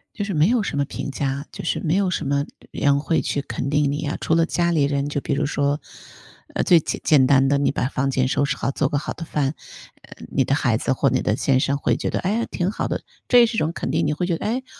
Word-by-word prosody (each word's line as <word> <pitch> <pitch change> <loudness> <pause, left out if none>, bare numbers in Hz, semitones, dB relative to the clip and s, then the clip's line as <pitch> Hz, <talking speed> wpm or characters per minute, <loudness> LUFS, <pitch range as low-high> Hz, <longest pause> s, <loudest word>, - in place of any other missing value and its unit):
就 205 - -2
是 200 - -3
没 155 +6 +3
有 240 -2 +2
什 155 -7 -3
么 140 - +2
评 - - -5
价， 140 +1 -3
就 - - -8
是 - - -1
没 165 +2 0
有 195 -2 +2
什 160 - -2
么 140 +1 +1 0.3
人 140 0 +2
会 160 +2 0
去 140 - -2
肯 140 -1 -4
定 145 -1 +2
你 145 - -2
呀， 150 0 -3
除 160 - +1
了 165 0 +4
家 170 0 0
里 155 -4 +2
人 140 0 0
就 145 -1 -2
比 - - -2
如 145 +1 0
说 145 0 0 0.7
呃， - - 0
最 170 -3 +5
简 - - -3
简 140 -4 +5
单 135 -1 +4
的， 140 +1 +3
你 140 - +1
把 130 - -1
房 135 0 -1
间 130 -1 +1
收 140 - +1
拾 140 - -1
好， 135 - -1
做 135 0 0
个 145 - 0
好 145 - -4
的 165 - -8
饭， 145 -2 -1 0.5
呃， - - -13
你 135 - +1
的 135 - 0
孩 120 -6 +2
子 130 - -1
或 135 +1 +2
你 - - 0
的 105 +3 0
先 135 -2 +2
生 140 0 +1
会 - - +1
觉 - - -2
得： - - -1
“诶！ 215 +5 0
挺 175 0 -1
好 - - -3
的！ - - -2 0.3
“这 245 - +7
也 235 - +7
是 225 0 -3
一 - - -2
种 155 +2 +1
肯 - - -4
定。 160 +3 +1
你 150 - +1
会 155 +4 -1
觉 170 -2 0
得：” - - -8
诶？ 255 +4 -1
145 Hz, 310 characters per minute, -22 LUFS, 140-165 Hz, 0.7 s, 这